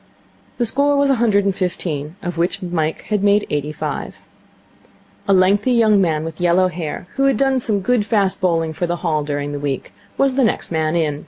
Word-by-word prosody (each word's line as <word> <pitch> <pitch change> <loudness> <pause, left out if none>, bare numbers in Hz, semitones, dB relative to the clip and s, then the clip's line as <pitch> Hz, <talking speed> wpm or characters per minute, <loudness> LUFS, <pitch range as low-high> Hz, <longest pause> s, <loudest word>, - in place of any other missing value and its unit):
The 240 - +1
score 285 +5 +1
was 280 -1 +3
a 250 -4 0
hundred 205 -4 +3
and 195 - +2
fifteen, 165 -5 -3
of 175 -1 -3
which 175 +3 -1
Mike 160 -3 -2
had 205 -2 +1
made 205 0 +3
eighty 150 0 -1
five. 155 - -5 1.1
A - - +2
lengthy 200 +6 +3
young 215 -4 +4
man 160 -4 0
with 165 +1 -7
yellow 180 +1 +3
hair, 170 -1 -5
who 275 - +2
had 270 -4 +3
done 270 0 +2
some 215 -4 -1
good 245 +2 +1
fast 205 -3 0
bowling 165 -3 +1
for 175 - -2
the 175 - -1
Hall 155 -3 +1
during 145 0 -3
the 145 - -4
week, 140 -2 -4 0.2
was 275 -1 +2
the 265 0 +2
next 225 - -1
man 160 0 0
in. 150 -4 0
185 Hz, 210 wpm, -19 LUFS, 160-215 Hz, 1.1 s, young